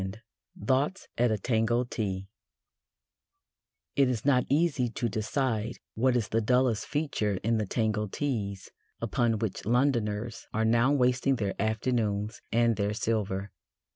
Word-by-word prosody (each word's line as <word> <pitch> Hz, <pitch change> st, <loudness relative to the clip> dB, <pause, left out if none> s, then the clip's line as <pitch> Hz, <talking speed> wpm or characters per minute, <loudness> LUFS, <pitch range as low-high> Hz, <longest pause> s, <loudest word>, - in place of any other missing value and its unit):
IV 95 Hz, +1 st, -4 dB, 0.5 s
THOUGHTS 140 Hz, -, +1 dB
AT 120 Hz, 0 st, +4 dB
A 110 Hz, -, +1 dB
TANGO 115 Hz, +2 st, +1 dB
TEA 100 Hz, -5 st, -3 dB, 1.7 s
It 135 Hz, -2 st, +4 dB
is 120 Hz, -2 st, -2 dB
not 130 Hz, -3 st, +3 dB
easy 140 Hz, -4 st, +2 dB
to 120 Hz, +1 st, -2 dB
decide 115 Hz, +1 st, -1 dB, 0.2 s
what 125 Hz, +2 st, +2 dB
is 115 Hz, -4 st, 0 dB
the 115 Hz, -, +1 dB
dullest 125 Hz, 0 st, +2 dB
feature 140 Hz, -9 st, -1 dB
in 115 Hz, 0 st, +2 dB
the 105 Hz, -, -1 dB
Tango 110 Hz, -1 st, 0 dB
Teas 100 Hz, -6 st, -3 dB, 0.3 s
upon 115 Hz, -2 st, +1 dB
which 105 Hz, -3 st, -3 dB
Londoners 115 Hz, -2 st, 0 dB
are 110 Hz, 0 st, +2 dB
now 120 Hz, +4 st, +4 dB
wasting 130 Hz, 0 st, +2 dB
their 100 Hz, -5 st, -1 dB
afternoons 110 Hz, -1 st, -1 dB
and 115 Hz, -1 st, +3 dB
their 105 Hz, 0 st, 0 dB
silver. 100 Hz, -3 st, -1 dB
115 Hz, 140 wpm, -29 LUFS, 105-125 Hz, 1.7 s, AT